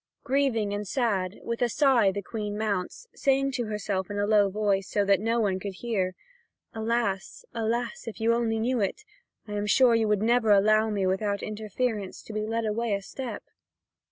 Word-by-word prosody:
Grieving 255 -7 +1
and 205 0 -3
sad, 200 -5 0
with 235 +1 -3
a 245 - +3
sigh 245 -6 +4
the 200 +1 -4
Queen 210 -1 -4
mounts, 210 - -2
saying 275 0 +1
to 245 -2 -2
herself 205 -3 -2
in 205 - -4
a 205 - +1
low 205 -1 +4
voice, 200 -1 0
so 205 -1 +1
that 200 0 +4
no 230 +3 0
one 195 -4 +1
could 195 0 -6
hear: 190 -5 -2 0.6
"Alas, 220 -3 -2
alas, 235 +1 -2
if 230 - -6
you 225 +1 +3
only 230 -1 0
knew 240 +3 0
it, 210 - -2 0.4
I 210 - -6
am 205 0 -2
sure 250 +2 +5
you 225 -1 +2
would 210 -1 +1
never 235 -1 +3
allow 215 +2 +5
me 200 -3 0
without 200 +2 0
interference 215 -1 -3
to 220 - -9
be 215 0 -2
led 225 0 -1
away 220 0 0
a 200 - -5
step." 260 +4 -6
215 Hz, 190 wpm, -27 LUFS, 200-235 Hz, 0.6 s, sure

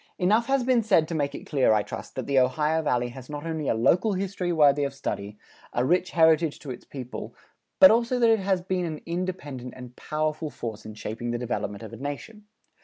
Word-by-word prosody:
Enough 215 +6 +2
has 270 -1 +2
been 250 -1 +3
said 190 -8 +3
to - - -3
make 145 -3 -1
it - - -8
clear, 135 -6 +3
I 105 -1 +2
trust, - - -8
that - - -3
the 140 -1 +3
Ohio 150 +5 +2
Valley 125 -5 0
has 130 +2 -11
not 145 +1 -6
only 160 -3 -3
a - - +2
local 180 - +3
history 185 -1 -2
worthy 145 -3 +4
of 140 -1 -3
study, 105 -6 -4 0.4
a 120 - +1
rich 180 +4 +2
heritage 160 -2 +3
to 140 - -6
its 125 - -8
people, 130 -3 -7 0.4
but 280 - +10
also 235 +2 +2
that 235 -2 +4
it 225 - +3
has 190 -2 0
been 185 -1 -1
an 155 -2 -5
independent 170 -8 -4
and 125 -1 -10
powerful 155 0 -2
force 110 -5 -7
in 110 - -9
shaping 115 +2 -5
the 120 - -1
development 115 -3 -3
of 110 - -9
a - - -7
nation. 145 +10 -7
155 Hz, 220 wpm, -26 LUFS, 125-185 Hz, 0.4 s, but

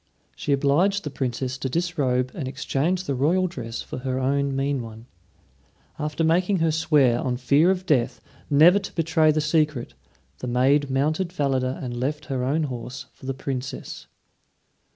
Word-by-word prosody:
She - - -3
obliged 155 +9 +2
the 150 - -5
Princess 130 0 -3
to 130 - -2
disrobe 135 -6 0
and 145 -7 -4
exchange 150 +6 -1
the 140 - -2
royal 160 +8 +2
dress 120 -10 -5
for - - -7
her 130 0 -2
own 140 +1 0
mean 135 0 0
one. 115 0 -10 0.9
After 150 +2 -2
making 180 +4 +2
her 165 -1 +2
swear, 145 -6 +3
on 125 -1 -1
fear 140 +7 +3
of 190 -1 0
death, 130 -7 +1 0.3
never 160 +7 +6
to 195 - -9
betray 160 -2 +3
the 155 0 0
secret, 150 -4 0 0.5
the 125 - -5
maid 135 +4 +2
mounted 155 +7 0
Falada 135 -6 -1
and 120 -1 -4
left 145 +5 -3
her 125 -1 -1
own 145 +5 +1
horse 125 -1 -6
for 130 - -12
the 135 - -2
Princess. 135 0 -5
140 Hz, 165 wpm, -24 LUFS, 130-160 Hz, 0.9 s, never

